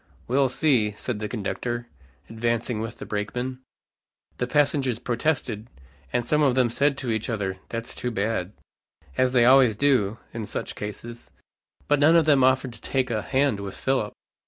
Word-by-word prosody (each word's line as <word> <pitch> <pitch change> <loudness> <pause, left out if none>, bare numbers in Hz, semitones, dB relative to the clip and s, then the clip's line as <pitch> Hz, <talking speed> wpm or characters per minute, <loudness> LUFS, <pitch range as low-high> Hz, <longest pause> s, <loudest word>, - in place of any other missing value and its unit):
"We'll 135 +2 +3
see," 125 -6 +2
said 120 -5 -4
the 105 0 -4
conductor, 120 +2 -3 0.4
advancing 115 0 -1
with 115 +1 -5
the - - -7
brakemen. 125 +5 -3 0.8
The 125 - 0
passengers 140 -3 +2
protested, 120 -2 -1 0.4
and 120 -1 0
some 150 +4 +2
of 135 -4 +3
them 125 -3 +3
said 140 +3 +2
to 125 -4 -2
each 110 +1 -2
other, 100 -4 -2
"That's 115 0 -4
too 125 - -3
bad," 105 -3 -2 0.6
as 130 -1 +2
they 125 -2 +4
always 130 -3 +6
do 115 -5 +2 0.2
in 110 -3 -5
such - - -4
cases, 115 +3 -8 0.6
but 145 -1 +3
none 155 +3 +6
of 165 -2 +5
them 145 -4 +5
offered 130 -1 +2
to 110 - -14
take 130 -2 -1
a 110 -2 0
hand 135 -3 +1
with 100 -1 -6
Philip. 130 -6 0
120 Hz, 170 wpm, -25 LUFS, 110-135 Hz, 0.8 s, always